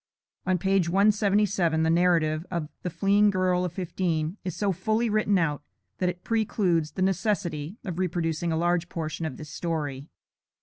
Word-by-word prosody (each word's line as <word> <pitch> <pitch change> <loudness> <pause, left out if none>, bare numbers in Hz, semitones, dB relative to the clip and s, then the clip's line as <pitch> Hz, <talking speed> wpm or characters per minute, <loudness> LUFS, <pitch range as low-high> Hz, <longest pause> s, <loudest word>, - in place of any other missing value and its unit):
[On 185 -1 +3
page 190 -1 +1
177 200 -4 +2
the 160 - +2
narrative 165 -3 +2
of 170 -4 -3
"The 180 - -3
Fleeing 200 +4 +3
Girl 185 -2 +1
of 180 - -2
Fifteen" 170 -2 -2
is 180 -3 -4
so 205 -2 +1
fully 215 +5 0
written 210 -2 +2
out, 150 -5 0 0.4
that 180 - +2
it 180 0 -6
precludes 195 -8 0
the 185 - -1
necessity 190 -4 -1
of 180 -3 -4
reproducing 170 -2 -1
a 160 - 0
large 175 +1 +1
portion 160 0 -3
of 140 - -7
this 155 -2 -9
story. 150 -5 -3
180 Hz, 165 wpm, -26 LUFS, 160-195 Hz, 0.4 s, On